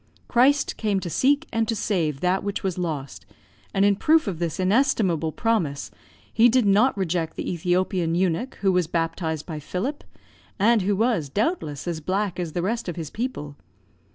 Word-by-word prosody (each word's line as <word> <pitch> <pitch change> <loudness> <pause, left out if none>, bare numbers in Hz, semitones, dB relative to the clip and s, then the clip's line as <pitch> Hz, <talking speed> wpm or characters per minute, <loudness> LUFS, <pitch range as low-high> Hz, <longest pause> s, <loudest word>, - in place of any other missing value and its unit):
Christ 270 +4 +3
came 210 -3 0
to 175 - -5
seek 285 - +2
and 225 -1 +1
to 225 - 0
save 165 -10 -1
that 185 +1 +1
which 200 +1 -3
was 185 -2 -2
lost; 150 -6 -4 0.5
and 195 0 +2
in 205 0 +4
proof 315 +9 +3
of 185 -6 -4
this 170 0 -2
inestimable 185 - +2
promise, 175 -10 -1 0.4
he 230 +2 +6
did 250 -1 +3
not 210 +5 +4
reject 170 -3 -1
the - - -4
Ethiopian 175 0 0
eunuch 190 +8 0
who 195 -1 +3
was 180 -3 +1
baptised 165 -2 -2
by 155 -3 -5
Philip, 200 - -4 0.5
and 220 +2 +4
who 200 +2 +1
was, 210 - +1
doubtless, 180 - -2
as 170 -2 -2
black 190 +2 -1
as 170 -3 -3
the 175 - -2
rest 225 +1 -2
of 170 - -4
his 160 -4 -6
people. 150 - -5
185 Hz, 180 wpm, -24 LUFS, 165-225 Hz, 0.5 s, he